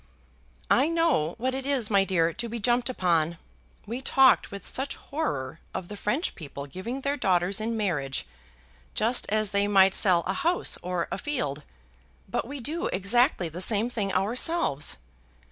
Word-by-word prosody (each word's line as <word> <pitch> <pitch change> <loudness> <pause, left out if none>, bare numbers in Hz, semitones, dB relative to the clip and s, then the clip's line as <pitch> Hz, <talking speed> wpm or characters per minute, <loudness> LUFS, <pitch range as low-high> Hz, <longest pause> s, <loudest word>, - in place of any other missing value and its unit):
"I 275 +5 +4
know 330 - +1
what 255 +3 -1
it 265 0 -3
is, 265 -6 0
my 200 -1 +5
dear, 170 -3 +1
to 235 0 -4
be 235 - -3
jumped 240 +3 +1
upon. 170 -7 +1 0.5
We 235 +4 -5
talked 265 -1 +4
with 200 -1 -8
such 270 +2 -2
horror 160 - -4 0.2
of 175 - -5
the 210 - -6
French 240 - -1
people 140 -3 -8
giving 185 - -6
their 280 +1 0
daughters 190 -4 +1
in 225 +1 -2
marriage, 145 - -1 0.7
just 235 +3 +1
as 215 -1 0
they 200 0 +2
might 195 -2 +5
sell 180 -4 +3
a 190 - -1
house 345 - +1
or 180 -1 -2
a - - -3
field, 150 - -2 0.7
but 230 +3 -2
we 280 +2 -6
do 315 +9 -2
exactly 200 - +2
the 165 +3 -6
same 220 +4 +2
thing 205 -5 -1
ourselves. 220 - +1
210 Hz, 165 wpm, -27 LUFS, 180-255 Hz, 0.7 s, my